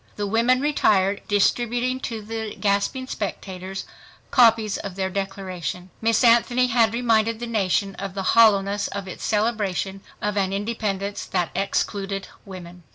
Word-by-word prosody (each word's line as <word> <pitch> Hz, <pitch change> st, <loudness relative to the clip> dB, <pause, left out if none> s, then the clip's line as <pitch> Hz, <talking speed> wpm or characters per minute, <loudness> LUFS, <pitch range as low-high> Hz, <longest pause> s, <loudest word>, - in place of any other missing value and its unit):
The 205 Hz, -, -2 dB
women 235 Hz, +5 st, +2 dB
retired, 205 Hz, -9 st, +2 dB
distributing 240 Hz, +5 st, +1 dB
to 225 Hz, -5 st, -5 dB
the 220 Hz, 0 st, -5 dB
gasping 205 Hz, +6 st, 0 dB
spectators 190 Hz, -4 st, -5 dB, 0.5 s
copies 225 Hz, -4 st, +4 dB
of 200 Hz, -3 st, -6 dB
their 190 Hz, -1 st, -2 dB
Declaration. 185 Hz, -3 st, -5 dB
Miss 225 Hz, +2 st, +2 dB
Anthony 240 Hz, +1 st, +4 dB
had 230 Hz, -2 st, +3 dB
reminded 230 Hz, -1 st, +1 dB
the 240 Hz, -, -4 dB
nation 200 Hz, -3 st, 0 dB
of 195 Hz, -1 st, -6 dB
the 195 Hz, -, -2 dB
hollowness 205 Hz, -3 st, +4 dB
of 200 Hz, -1 st, -6 dB
its 185 Hz, -, -8 dB
celebration 205 Hz, -3 st, -1 dB, 0.2 s
of 210 Hz, 0 st, -2 dB
an 195 Hz, -1 st, +1 dB
independence 205 Hz, -1 st, -3 dB
that 180 Hz, -3 st, -1 dB
excluded 195 Hz, +1 st, -2 dB, 0.2 s
women. 180 Hz, -2 st, -10 dB
205 Hz, 140 wpm, -23 LUFS, 195-230 Hz, 0.5 s, copies